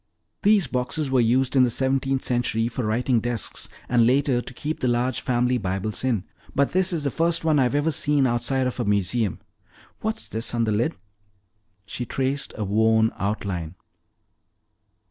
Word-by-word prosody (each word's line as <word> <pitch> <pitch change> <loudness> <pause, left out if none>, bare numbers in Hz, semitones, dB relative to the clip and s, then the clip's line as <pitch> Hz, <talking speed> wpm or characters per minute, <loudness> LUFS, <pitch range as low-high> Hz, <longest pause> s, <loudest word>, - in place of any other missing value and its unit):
"These 205 -3 +4
boxes 130 +3 -2
were 130 - +3
used 125 +3 +2
in 130 - +6
the 125 - +3
seventeenth 135 +2 0
century 120 -2 0
for 120 +1 -4
writing 120 +3 +1
desks 120 -1 -3 0.2
and 120 -1 +3
later 130 +1 +2
to 125 - -7
keep 155 +4 -4
the 130 - 0
large 120 +1 0
family 125 0 +1
Bibles 95 +3 -2
in. 120 -8 0 0.3
But 140 0 +2
this 185 0 +2
is 165 -4 -2
the 140 - 0
first 165 +2 0
one 155 -2 +3
I've 130 +1 +2
ever 145 +3 +2
seen 145 -2 +2
outside 130 +2 +1
of 125 0 -3
a - - +1
museum. 100 +1 0 0.6
What's 220 +1 -2
this 115 +2 -3
on 115 - +1
the 110 - 0
lid?" 105 +3 0 0.9
She 120 +4 -5
traced 135 +1 -1
a 110 - -2
worn 110 +2 +3
outline. 95 -5 -3
125 Hz, 170 wpm, -24 LUFS, 110-135 Hz, 0.9 s, in